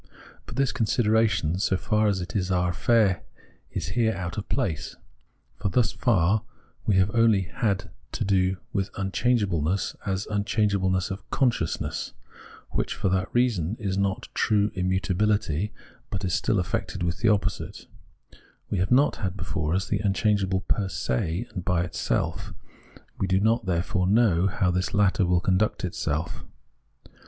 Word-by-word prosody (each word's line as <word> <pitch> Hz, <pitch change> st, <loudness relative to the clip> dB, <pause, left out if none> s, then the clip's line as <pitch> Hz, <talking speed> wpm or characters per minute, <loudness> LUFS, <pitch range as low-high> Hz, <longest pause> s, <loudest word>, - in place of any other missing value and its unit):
But -, -, -8 dB
this 135 Hz, 0 st, +2 dB
consideration, 110 Hz, -7 st, +2 dB
so 95 Hz, -, +1 dB
far 105 Hz, +2 st, +1 dB
as 100 Hz, -3 st, +1 dB
it 90 Hz, -, -7 dB
is 95 Hz, -2 st, 0 dB
our 90 Hz, -1 st, +1 dB
affair, 105 Hz, 0 st, +2 dB, 0.2 s
§ -, -, -25 dB, 0.3 s
is -, -, -4 dB
here 115 Hz, -2 st, +1 dB
out 85 Hz, -2 st, -4 dB
of 105 Hz, -, -5 dB
place, 80 Hz, -6 st, -2 dB, 0.6 s
for 100 Hz, -, -1 dB
thus 115 Hz, +2 st, +2 dB
far 105 Hz, -3 st, +2 dB, 0.5 s
we 105 Hz, -, +3 dB
have 95 Hz, +2 st, +3 dB
only 115 Hz, -4 st, +4 dB
had 100 Hz, -1 st, -2 dB, 0.2 s
to -, -, -1 dB
do 95 Hz, -1 st, +2 dB, 0.2 s
with 100 Hz, -2 st, 0 dB
im 95 Hz, 0 st, -2 dB
changeableness 95 Hz, -8 st, +1 dB
as 95 Hz, 0 st, -2 dB
unchangeableness 100 Hz, -3 st, 0 dB
of 95 Hz, +1 st, -7 dB
consciousness, 120 Hz, -, -1 dB, 0.6 s
which, -, -, -1 dB
for -, -, 0 dB
that 95 Hz, 0 st, 0 dB
reason, 110 Hz, -7 st, +1 dB
is 100 Hz, -4 st, -2 dB
not 100 Hz, +3 st, -1 dB
true 105 Hz, -1 st, +2 dB
immutabihty, 95 Hz, 0 st, 0 dB, 0.4 s
but 95 Hz, 0 st, -3 dB
is 90 Hz, -, -1 dB
still 110 Hz, -, +1 dB
affected 95 Hz, 0 st, -2 dB
with 85 Hz, +4 st, -2 dB
an 115 Hz, -, +5 dB
opposite; 105 Hz, -2 st, -1 dB, 0.9 s
we 100 Hz, -, 0 dB
have 95 Hz, -, 0 dB
not 135 Hz, +4 st, +4 dB
had 95 Hz, -2 st, -3 dB
before 85 Hz, -3 st, -2 dB
us 95 Hz, -, -1 dB
the 105 Hz, -, 0 dB
unchangeable 95 Hz, -1 st, +1 dB
per 100 Hz, 0 st, 0 dB
se 80 Hz, -, -1 dB
and 90 Hz, -4 st, -4 dB
by 90 Hz, -2 st, +1 dB
itself; 90 Hz, -, -2 dB, 0.6 s
we 95 Hz, -, 0 dB
do 95 Hz, 0 st, +2 dB
not, 110 Hz, 0 st, +1 dB
therefore, 90 Hz, +1 st, 0 dB
know 100 Hz, -4 st, +4 dB
how 90 Hz, -1 st, +1 dB
this 90 Hz, +3 st, -1 dB
latter 100 Hz, -2 st, +3 dB
will 90 Hz, 0 st, +3 dB
conduct 95 Hz, +2 st, +1 dB
itself. 80 Hz, -2 st, -3 dB
95 Hz, 155 wpm, -26 LUFS, 90-105 Hz, 0.9 s, an